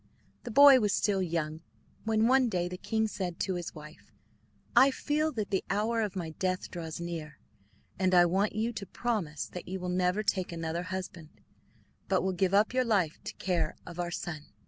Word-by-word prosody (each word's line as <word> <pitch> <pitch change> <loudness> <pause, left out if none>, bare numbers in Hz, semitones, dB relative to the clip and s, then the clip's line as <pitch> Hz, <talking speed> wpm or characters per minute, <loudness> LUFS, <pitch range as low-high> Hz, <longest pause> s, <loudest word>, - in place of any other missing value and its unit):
The - - -4
boy 275 +2 +8
was 210 -3 +1
still 200 -2 +1
young 160 -3 -2 0.4
when, 220 0 +3
one 260 -1 +4
day, 175 -4 -1
the 180 - -5
king 220 0 0
said 180 -5 -4
to 190 - 0
his 175 -1 -5
wife: 150 +1 -12 0.6
"I 270 - +8
feel 305 +3 0
that 215 -4 -3
the 190 - +1
hour 220 +3 +1
of 205 -3 -2
my 170 -4 -4
death 185 +3 -2
draws 165 -3 -6
near, 165 -4 -6 0.6
and 185 -1 +3
I 175 0 +7
want 195 +5 +1
you 225 +2 -1
to 200 -3 -6
promise 195 -13 -2
that 180 - -8
you 190 +1 -4
will 180 0 -4
never 180 +3 +1
take 185 -4 0
another 165 0 -3
husband 180 -4 -6 0.8
but - - +2
will 190 0 0
give 185 +1 +1
up 210 +4 +3
your 255 0 +3
life 195 -10 0
to - - -5
the - - -38
care 180 -3 -1
of 175 0 -9
our 175 0 -1
son." 160 -3 -5
185 Hz, 200 wpm, -30 LUFS, 170-215 Hz, 0.8 s, boy